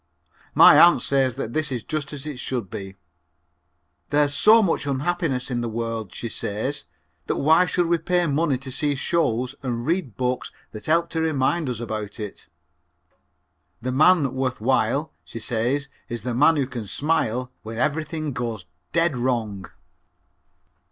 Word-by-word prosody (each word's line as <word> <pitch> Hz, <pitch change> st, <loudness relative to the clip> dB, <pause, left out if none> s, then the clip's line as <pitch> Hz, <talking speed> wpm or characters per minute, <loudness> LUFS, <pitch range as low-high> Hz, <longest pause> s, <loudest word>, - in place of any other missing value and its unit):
My -, -, +9 dB
aunt 175 Hz, 0 st, +7 dB
says 135 Hz, -3 st, +1 dB
that 115 Hz, -, -5 dB
this 155 Hz, -2 st, -1 dB
is 120 Hz, -3 st, -3 dB
just 155 Hz, -2 st, -4 dB
as 145 Hz, -2 st, -7 dB
it 145 Hz, -5 st, -6 dB
should 120 Hz, -9 st, -4 dB
be. 95 Hz, -1 st, -7 dB, 1.1 s
"There's 145 Hz, 0 st, +2 dB
so 215 Hz, +9 st, +6 dB
much 165 Hz, -6 st, 0 dB
unhappiness 140 Hz, -2 st, -1 dB
in 120 Hz, -1 st, -1 dB
the 120 Hz, -, -2 dB
world," 115 Hz, -3 st, -4 dB
she 115 Hz, -, -5 dB
says, 115 Hz, +6 st, -3 dB, 0.4 s
"that -, -, 0 dB
why 160 Hz, +5 st, +4 dB
should 175 Hz, +1 st, +1 dB
we 170 Hz, 0 st, +1 dB
pay 175 Hz, +2 st, +1 dB
money 150 Hz, -2 st, +1 dB
to 130 Hz, +1 st, -8 dB
see 145 Hz, +2 st, 0 dB
shows 130 Hz, -4 st, 0 dB
and 120 Hz, -3 st, -3 dB
read 165 Hz, -, -1 dB
books 125 Hz, 0 st, -2 dB, 0.2 s
that 105 Hz, -, -9 dB
help 170 Hz, +2 st, +2 dB
to 160 Hz, -, -1 dB
remind 155 Hz, 0 st, +1 dB
us 120 Hz, -3 st, -3 dB
about 110 Hz, -3 st, -5 dB
it. 105 Hz, -2 st, -7 dB, 1.3 s
The 130 Hz, -, -3 dB
man 150 Hz, 0 st, +4 dB
worth 130 Hz, -1 st, -2 dB
while," 130 Hz, +5 st, +1 dB
she -, -, -10 dB
says, 125 Hz, +5 st, -1 dB, 0.2 s
"is 120 Hz, -3 st, -5 dB
the 125 Hz, 0 st, -2 dB
man 150 Hz, +7 st, +5 dB
who 140 Hz, -3 st, +1 dB
can 120 Hz, -5 st, -6 dB
smile 125 Hz, -3 st, -1 dB
when 110 Hz, +1 st, -7 dB
everything 155 Hz, +2 st, -1 dB
goes 115 Hz, -6 st, -4 dB, 0.3 s
dead 165 Hz, -3 st, +2 dB
wrong." 115 Hz, -6 st, -2 dB
130 Hz, 160 wpm, -23 LUFS, 120-155 Hz, 1.3 s, My